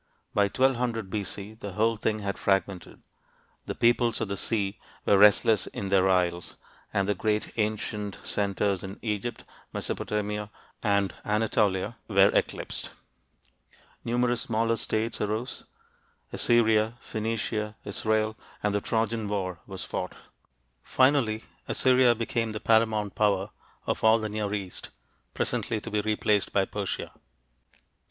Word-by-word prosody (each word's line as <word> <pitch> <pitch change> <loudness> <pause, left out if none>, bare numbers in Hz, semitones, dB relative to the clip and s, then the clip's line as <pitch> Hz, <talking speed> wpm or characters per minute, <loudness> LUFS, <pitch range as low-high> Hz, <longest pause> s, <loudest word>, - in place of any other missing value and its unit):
By 100 - +4
1200 120 -3 0
B.C., 100 0 -4
the 100 -3 -6
whole 115 +4 +2
thing 110 0 -1
had 100 -1 -3
fragmented: 95 -2 -1 0.6
"the - - -3
peoples 120 0 +3
of 105 - -2
the 100 - -1
sea 100 -1 -1 0.3
were - - +5
restless 105 +1 +5
in 100 - -5
their 95 -1 +4
isles," 90 -2 +1 0.4
and 100 -1 +1
the 105 - +2
great 105 +2 -1
ancient 105 -2 -2
centers 100 -1 0
in 95 +1 -7
Egypt, 105 +1 -3 0.3
Mesopotamia, 105 0 -3 0.3
and 100 -3 +1
Anatolia 105 -1 +1
were 100 -2 +5
eclipsed. - - -1 1.1
Numerous 120 0 +1
smaller 115 0 +1
states 110 +1 -1
arose 110 +4 -3 0.7
Assyria, 110 -1 +3
Phoenicia, 110 -1 -3
Israel 110 +1 0 0.3
and 105 -1 +1
the 105 - +1
Trojan 115 0 -1
war 95 -4 -2
was 95 -1 -6
fought. - - -4 0.7
Finally 130 - +2 0.2
Assyria 125 -2 +4
became 115 0 -1
the 105 - -3
paramount 110 -2 +2
power 100 -1 +1 0.3
of - - -2
all 110 0 +6
the 110 -1 -3
Near 105 -1 -2
East, 95 -3 -6 0.5
presently 110 - -1
to 115 - -8
be 105 0 +1
replaced 105 -1 +1
by 95 -1 +2
Persia. 100 -1 -4
105 Hz, 130 wpm, -27 LUFS, 100-115 Hz, 1.1 s, all